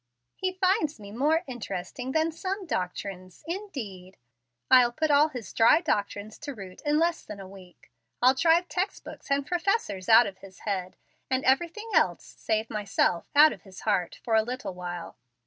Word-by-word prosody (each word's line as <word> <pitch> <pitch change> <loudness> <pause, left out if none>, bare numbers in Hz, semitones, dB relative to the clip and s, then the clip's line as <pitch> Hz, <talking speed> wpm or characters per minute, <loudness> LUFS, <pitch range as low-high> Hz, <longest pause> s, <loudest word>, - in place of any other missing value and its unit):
"He 370 -1 -2
finds 370 - +1
me 200 -1 -10
'more 300 +9 +1
interesting 245 - -5
than 320 +3 +1
some 380 +4 -4
doctrines,' 185 - -5
indeed! 230 - -6 0.5
I'll 250 -2 +7
put 310 +4 0
all 290 +2 +6
his 245 -8 -8
dry 225 +7 +6
doctrines 210 - -2
to 290 -2 -6
rout 190 -3 -10
in 295 0 +2
less 335 +1 +1
than 210 - -9
a 195 - -8
week. 185 -7 -16 0.3
I'll 255 +1 +6
drive 330 +5 +3
text 375 +3 -2
books - - -11
and 280 0 +1
professors 345 - -1
out 230 +2 +8
of 195 -2 -7
his 195 -1 -14
head, 185 -3 -3 0.3
and 260 0 0
everything 345 +11 +1
else 185 - +2
(save 220 0 -2
myself) 205 -5 0
out 305 +2 +8
of - - -13
his 190 -2 -13
heart, 195 -5 0
for 230 - -2
a 220 - +6
little 250 -2 -5
while. 175 -1 -7
245 Hz, 175 wpm, -27 LUFS, 195-315 Hz, 0.5 s, out